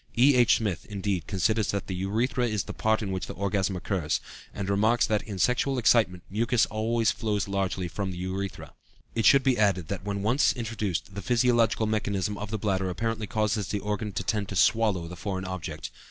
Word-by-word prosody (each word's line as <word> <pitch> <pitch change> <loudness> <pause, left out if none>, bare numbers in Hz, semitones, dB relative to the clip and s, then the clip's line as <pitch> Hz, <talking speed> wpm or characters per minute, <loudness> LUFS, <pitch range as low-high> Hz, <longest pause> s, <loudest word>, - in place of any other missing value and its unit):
E.H. 125 -1 +6
Smith, 100 -7 -2
indeed, 100 -5 -2
considers 105 +2 +1
that 100 -1 -1
"the 95 - -4
urethra 115 +7 0
is 105 -4 -1
the - - -7
part 110 0 +1
in 100 - -3
which 95 -1 -3
the - - -7
orgasm 100 0 0
occurs," 90 -4 -1 0.3
and 100 -1 -5
remarks 110 +4 +3
that 105 -2 +1
in 105 -3 -7
sexual 125 +6 +1
excitement 110 -6 +3
mucus 115 +3 +2
always 110 +1 +1
flows 105 -3 -1
largely 95 -2 -1
from 95 +2 -3
the 90 - -6
urethra. 95 +1 -5 0.4
It 115 -2 0
should 140 -1 +6
be 130 -4 +2
added 95 -6 +2
that 100 -1 -4
when 100 -1 -3
once 120 +7 +3
introduced 110 -6 -3
the 100 - -5
physiological 120 -1 +2
mechanism 105 -2 -1
of 105 0 -5
the 110 - -2
bladder 95 -3 0
apparently 110 +3 -2
causes 105 -2 0
the 105 - -2
organ 105 +1 -3
to 95 - -2
tend 105 -3 -1
to 100 - -5
"swallow" 105 -4 +2
the 90 - -8
foreign 95 0 -4
object. 80 -5 -5
105 Hz, 195 wpm, -27 LUFS, 95-115 Hz, 0.4 s, E.H